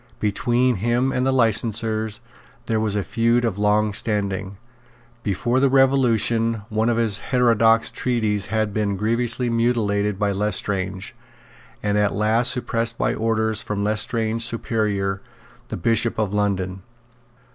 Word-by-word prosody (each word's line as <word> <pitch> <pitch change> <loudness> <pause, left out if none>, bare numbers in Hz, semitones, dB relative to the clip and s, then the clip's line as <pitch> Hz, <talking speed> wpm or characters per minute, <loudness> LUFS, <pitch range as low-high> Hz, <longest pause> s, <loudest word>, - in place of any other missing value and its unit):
Between 120 +3 +1
him 120 +6 +1
and 125 0 0
the - - +3
licensers 110 -2 0 0.4
there 110 -2 0
was 110 -2 0
a 100 - 0
feud 115 +3 +1
of 105 -4 -2
long 105 0 +2
standing. 100 -3 -2 0.6
Before 120 +5 0
the 135 0 +3
Revolution 120 -4 +2
one 110 +2 0
of 115 - +1
his 110 -3 0
heterodox 115 -3 +3
treatises 110 -5 -1
had 110 -2 -1
been 100 -2 -1
grievously 120 +4 0
mutilated 105 -4 0
by 100 0 0
Lestrange, 100 -1 -2 0.7
and 105 0 +1
at 105 -1 +1
last 110 +4 +2
suppressed 115 -2 -2
by - - 0
orders 110 -1 0
from 100 -1 -3
Lestrange's 110 +2 -1
superior 105 -4 -1 0.5
the - - -5
Bishop 115 0 +1
of 105 -2 -1
London. 95 -2 -1
110 Hz, 135 wpm, -22 LUFS, 105-115 Hz, 0.7 s, the